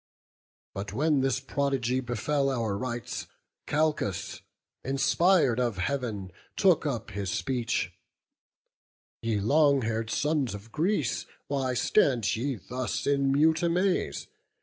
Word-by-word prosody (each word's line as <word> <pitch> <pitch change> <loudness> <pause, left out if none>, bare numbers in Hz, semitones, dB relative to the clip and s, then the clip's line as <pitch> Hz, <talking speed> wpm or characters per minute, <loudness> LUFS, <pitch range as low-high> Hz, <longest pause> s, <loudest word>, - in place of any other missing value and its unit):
But 100 +1 -5
when 145 +3 +2
this 135 0 +1
prodigy 135 -2 0
befell 135 +3 0
our 115 -6 -1
rites, 120 +2 -4 0.4
Calchas, 150 - -1 0.4
inspir'd 135 0 +3
of 120 -6 0
Heaven, 105 -2 -2 0.2
took 180 -5 +3
up 115 -5 -3
his 100 -1 -3
speech: 125 +2 -1 1.3
'Ye 115 -2 0
long 140 +4 +4
haired 110 0 -2
sons 145 -4 0
of 105 +3 -11
Greece, 155 - 0 0.2
why 135 -3 0
stand 125 - +2
ye 130 +4 -1
thus 125 +6 -4
In 140 -1 +2
mute 160 +3 +3
amaze? 180 +2 0
130 Hz, 115 wpm, -28 LUFS, 115-145 Hz, 1.3 s, long